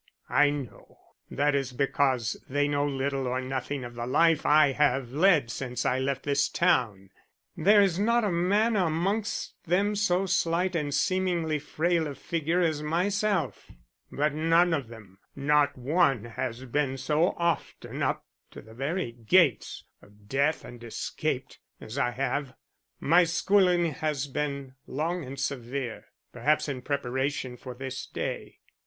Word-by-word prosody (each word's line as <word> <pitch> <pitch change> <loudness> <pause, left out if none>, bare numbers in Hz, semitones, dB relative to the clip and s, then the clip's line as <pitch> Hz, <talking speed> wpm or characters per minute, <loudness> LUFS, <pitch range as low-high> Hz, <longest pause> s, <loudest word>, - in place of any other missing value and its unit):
"I 145 - +5
know. 145 -5 -7 0.3
That 145 +1 +1
is 135 -2 -1
because 130 -3 0
they 145 +2 +1
know 145 0 0
little 135 -1 -2
or 125 +1 -1
nothing 130 +1 -3
of 120 0 -8
the 120 0 -5
life 160 +4 +3
I 150 -1 +6
have 135 -3 +1
led 150 -5 +3
since 125 -2 -4
I 130 - +1
left 135 0 -2
this 140 0 +1
town. 110 - +1 0.4
There 205 +5 +5
is 185 -2 +1
not 235 +3 +2
a 205 - +1
man 200 +7 +2
amongst 190 +4 -1
them 200 +5 +2
so 195 -2 +1
slight 180 0 +1
and 150 -3 -1
seemingly 170 -1 0
frail 165 +2 0
of 140 - -7
figure 165 +2 -1
as 160 -3 +1
myself, 185 - -1 0.4
but 150 +1 0
none 165 +3 +3
of 140 -6 -1
them, 105 -5 -14 0.2
not 145 0 +2
one, 135 - +2
has 125 +1 -5
been 135 +1 -1
so 155 +6 +1
often 170 -3 -2
up - - -1 0.2
to - - -12
the 110 - -15
very 140 +3 -2
gates 120 - +2 0.2
of 105 0 -21
death 140 +6 0
and 120 -1 -11
escaped, 115 - -4 0.2
as 115 +6 -6
I 120 - +2
have. 135 +2 -2 0.4
My 170 +5 +5
schooling 175 0 +2
has 150 -1 -2
been 140 -1 -4
long 165 +5 -2
and 135 +1 -8
severe, 130 -2 -4 0.3
perhaps 150 +1 +1
in 135 -3 -4
preparation 130 -1 -2
for 125 -1 -9
this 130 0 -6
day. - - -5
145 Hz, 150 wpm, -27 LUFS, 130-170 Hz, 0.4 s, I